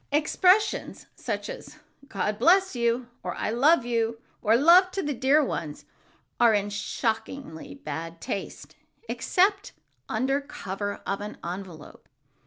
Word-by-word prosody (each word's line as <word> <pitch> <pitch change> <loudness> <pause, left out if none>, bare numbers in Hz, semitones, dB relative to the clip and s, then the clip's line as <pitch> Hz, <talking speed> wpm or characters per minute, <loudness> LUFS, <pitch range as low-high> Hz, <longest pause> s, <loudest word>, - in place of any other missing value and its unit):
Expressions 365 +7 +2
such - - -4
as - - -9 0.3
"God 210 -1 -2
bless 370 +5 +4
you!" 235 +1 0
or - - -4
"I - - -2
love 270 +3 +4
you," 230 -1 -1 0.2
or 220 0 +4
"Love 340 +8 +6
to 390 - -2
the 295 -1 -1
dear 275 +4 +3
ones," 150 - -5 0.5
are 235 -2 +5
in 205 0 -1
shockingly 220 - -4
bad 165 - -6
taste 195 - -6 0.3
except 395 +2 +1 0.4
under 265 +5 0
cover 205 -7 -5
of 200 +1 -2
an 210 +1 -7
envelope. 175 -3 -8
235 Hz, 130 wpm, -26 LUFS, 205-295 Hz, 0.5 s, Love